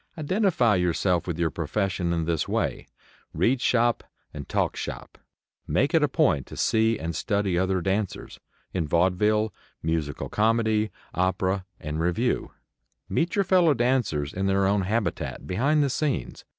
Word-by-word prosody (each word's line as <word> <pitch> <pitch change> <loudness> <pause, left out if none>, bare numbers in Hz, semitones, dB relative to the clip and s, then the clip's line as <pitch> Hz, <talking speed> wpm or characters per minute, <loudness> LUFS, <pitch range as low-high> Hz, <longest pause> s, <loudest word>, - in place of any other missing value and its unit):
Identify 155 - +2
yourself 90 0 +1
with 85 -3 -2
your 85 -2 0
profession 90 +1 -1
in 85 -1 0
this 80 -2 -1
way; - - -2 0.5
read 125 +2 +2
"shop" 120 -1 +2 0.3
and 70 -2 -8
talk - - 0
"shop." - - -7 0.5
Make 140 - +1
it 165 - +4
a 150 - +4
point 130 - +1
to - - -10
see 110 0 +2
and 80 0 -4
study 100 +1 0
other 95 +1 +1
dancers, 95 +2 -3 0.3
in 85 -4 -1
vaudeville, 105 +6 +2 0.3
musical 80 -3 -2
comedy, 110 0 +1 0.2
opera 95 +1 0
and 75 +1 -4
revue. 90 +9 0 0.6
Meet 170 +2 0
your 200 -1 +2
fellow 175 -5 +4
dancers 120 - 0
in 95 +1 -1
their 95 0 +2
own 100 +1 +2
habitat, 100 -1 -2
behind 140 +11 +2
the 140 - +1
scenes. 140 - -2
100 Hz, 150 wpm, -26 LUFS, 85-120 Hz, 0.6 s, it